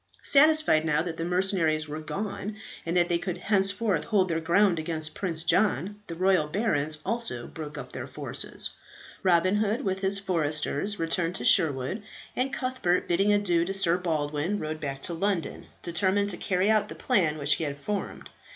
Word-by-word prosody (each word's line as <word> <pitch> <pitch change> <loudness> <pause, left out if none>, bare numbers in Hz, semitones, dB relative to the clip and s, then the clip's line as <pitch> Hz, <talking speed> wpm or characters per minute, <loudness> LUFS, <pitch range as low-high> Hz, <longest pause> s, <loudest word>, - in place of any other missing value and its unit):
Satisfied, 305 - +4
now 155 -1 +1
that 170 -2 -5
the 165 - -3
mercenaries 175 -3 +1
were 150 +1 -5
gone, 200 +5 -4 0.3
that 175 +1 +3
they 170 -1 +1
could 180 -1 -4
henceforth 195 -1 +1
hold 190 -4 +2
their 165 -1 0
ground 175 +2 +3
against 155 -1 -3
Prince 165 -4 -2
John, 205 +2 +1
the 170 - -6
royal 185 -3 +2
barons 155 -5 0
also 230 - -2
broke 150 -2 -8
up 135 - -7
their - - -6
forces. - - -2 0.5
Robin 185 +2 +3
Hood 215 +4 0
with 190 -4 -1
his 195 +1 +1
foresters 170 +1 -1
returned 165 +1 -1
to - - -4
Sherwood; 150 - +2 0.3
and 260 +2 0
Cuthbert, 255 -9 0
bidding 195 +4 +2
adieu 190 -5 +2
to 195 +3 -3
Sir 185 -3 +3
Baldwin, 160 +1 -1
rode 155 -3 -4
back 135 -2 -5
to 175 - -1
London, 185 0 -2 0.2
determined 195 +4 +1
to 175 - -3
carry 190 +3 +1
out 215 -1 +2
the - - -7
plan 155 -6 +1
which 145 0 +2
he - - -3
had 145 -2 -3
formed. 200 +8 -5
175 Hz, 175 wpm, -27 LUFS, 155-200 Hz, 0.5 s, Satisfied